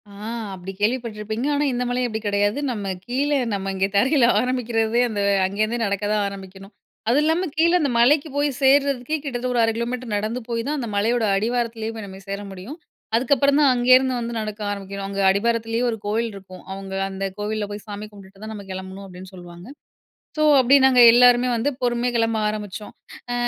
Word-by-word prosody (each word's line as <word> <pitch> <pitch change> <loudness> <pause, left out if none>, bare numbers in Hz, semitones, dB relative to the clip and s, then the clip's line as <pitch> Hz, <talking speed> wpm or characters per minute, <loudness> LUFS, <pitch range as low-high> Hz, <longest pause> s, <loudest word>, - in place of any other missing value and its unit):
ஆ - - -15 0.4
அப்டி 190 0 -7
கேள்விப்பட்டுருப்பீங்க. 220 +1 -2
ஆனா, 290 +1 +1
இந்த 245 0 -1
மலை 250 +1 -1
அப்டி 220 -2 -4
கிடையாது. 205 +4 +1
நம்ம 210 -4 -5 0.2
கீழ 265 +4 -1 0.2
நம்ம 195 -1 -2
இங்க 190 0 +1
தரையில 260 +5 +4
ஆரம்பிக்கிறதே 240 -2 0
அந்த 210 -2 -4 0.3
அங்கேருந்தே 215 +5 -1
நடக்க 200 0 -2
தான் 210 -1 +1
ஆரம்பிக்கணும். 195 0 -10 0.4
அது 255 +5 +4
இல்லாம 325 +4 +1
கீழ 335 +2 +4
அந்த 285 - +1
மலைக்கு 285 +6 +4
போய் 290 0 +2
சேர்றதுக்கே 275 +1 +2
கிட்டத்தட்ட 250 -3 -3
ஒரு 245 - +1
1/2 225 - +2
கிலோமீட்டர் 240 -1 -4
நடந்து 215 +4 -2
போய் 230 -1 -1
தான் 300 +1 -1
அந்த 240 - -4
மலையோட 225 +4 +1
அடிவாரத்திலேயே 230 0 -2
போய் 220 -2 -7
நம்ம 190 0 -10
சேர 200 0 -3
முடியும். 195 +10 -8 0.4
அதுக்கப்புறம் 280 +3 +2
தான் 285 -3 +5
அங்கேருந்து 255 +1 +4
வந்து 235 0 -4
நடக்க 215 -1 -5
ஆரம்பிக்கணும். 200 0 -6
அங்க 200 0 -3
அடிபாரத்திலேயே 225 +3 0
ஒரு 225 - -4
கோவில் 225 +3 -1
இருக்கும். 185 -2 -12
அவங்க 195 0 -7 0.2
அந்த 195 0 -6 0.2
கோவில்ல 210 0 -2
போய் 205 0 -7
சாமி 205 0 -6
கும்பிட்டுட்டு 195 0 -15
தான் 220 - -6
நம்ம 205 -2 -9
கிளம்பணும், 190 +1 -7
அப்டின்னு 185 +1 -11
சொல்லுவாங்க. 175 +1 -12 0.7
ஸோ, 305 - 0 0.2
அப்டி 260 +2 +5
நாங்க 255 -2 +5
எல்லாருமே 245 +1 +5
வந்து 240 +6 0
பொறுமையா 240 0 0
கிளம்ப 225 -1 +1
ஆரம்பிச்சோம். 210 -1 -6 0.4
ஆ - - -1
225 Hz, 180 wpm, -22 LUFS, 200-250 Hz, 0.7 s, தான்